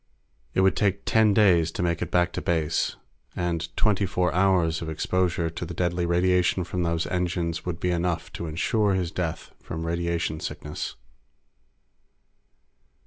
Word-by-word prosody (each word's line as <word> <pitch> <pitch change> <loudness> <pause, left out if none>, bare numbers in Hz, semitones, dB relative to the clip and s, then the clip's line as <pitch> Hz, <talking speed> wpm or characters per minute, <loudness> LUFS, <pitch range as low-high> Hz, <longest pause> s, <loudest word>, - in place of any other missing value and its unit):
It - - +4
would 95 0 +4
take 100 -1 0
ten 110 -1 +4
days 90 -6 +4
to - - -2
make 85 -1 0
it 90 - -2
back 90 0 +2
to - - -3
base, 80 -3 0 0.4
and 85 -2 -2
twenty 100 -2 +2
four 90 -2 0
hours 90 -3 +2
of 80 - -4
exposure 85 +1 0
to 90 +2 -6
the 85 0 -6
deadly 90 -1 0
radiation 90 +1 +2
from 90 +1 -3
those 85 -1 0
engines 85 -2 -2
would 85 -1 -3
be 90 - 0
enough 85 -1 -1
to 85 - -5
insure 100 +5 +1
his 90 -3 -1
death 85 -4 -4
from 80 0 -5
radiation 85 -1 -1
sickness. 75 -1 -5
85 Hz, 155 wpm, -26 LUFS, 85-90 Hz, 0.4 s, It